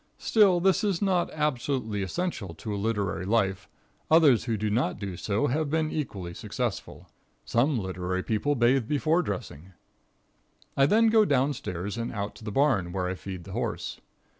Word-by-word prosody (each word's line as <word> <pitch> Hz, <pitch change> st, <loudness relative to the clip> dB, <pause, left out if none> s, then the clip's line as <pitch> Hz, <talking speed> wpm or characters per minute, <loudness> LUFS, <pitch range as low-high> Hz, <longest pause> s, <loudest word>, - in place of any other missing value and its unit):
Still 200 Hz, -5 st, +4 dB
this 190 Hz, +1 st, +2 dB
is 200 Hz, -5 st, +1 dB
not 185 Hz, -3 st, +1 dB
absolutely 130 Hz, -7 st, -1 dB
essential 100 Hz, -, -3 dB
to 105 Hz, +6 st, -5 dB
a -, -, -2 dB
literary 100 Hz, -3 st, -1 dB
life. 95 Hz, -2 st, 0 dB, 0.4 s
Others 150 Hz, -8 st, +5 dB
who 115 Hz, -3 st, -1 dB
do 105 Hz, 0 st, -1 dB
not 120 Hz, +5 st, 0 dB
do 100 Hz, -3 st, -5 dB
so 105 Hz, +8 st, -1 dB
have 145 Hz, +2 st, 0 dB
been 160 Hz, 0 st, 0 dB
equally 100 Hz, -, -4 dB
successful. -, -, -4 dB, 0.4 s
Some 130 Hz, +4 st, +2 dB
literary 95 Hz, -2 st, -3 dB
people 115 Hz, +7 st, 0 dB
bathe 120 Hz, -1 st, +3 dB
before 155 Hz, +5 st, +2 dB
dressing. 95 Hz, -, -6 dB, 1.0 s
I 135 Hz, 0 st, +4 dB
then 225 Hz, +6 st, +4 dB
go 220 Hz, -1 st, +5 dB
down 140 Hz, -4 st, +2 dB
stairs 100 Hz, -1 st, -5 dB
and 115 Hz, -, -3 dB
out 100 Hz, -1 st, -4 dB
to -, -, -14 dB
the 105 Hz, -, -4 dB
barn, 115 Hz, -9 st, +2 dB
where 90 Hz, 0 st, -2 dB
I 90 Hz, -, -2 dB
feed 95 Hz, -1 st, -7 dB
the -, -, -10 dB
horse. -, -, -4 dB
115 Hz, 170 wpm, -27 LUFS, 100-150 Hz, 1.0 s, Others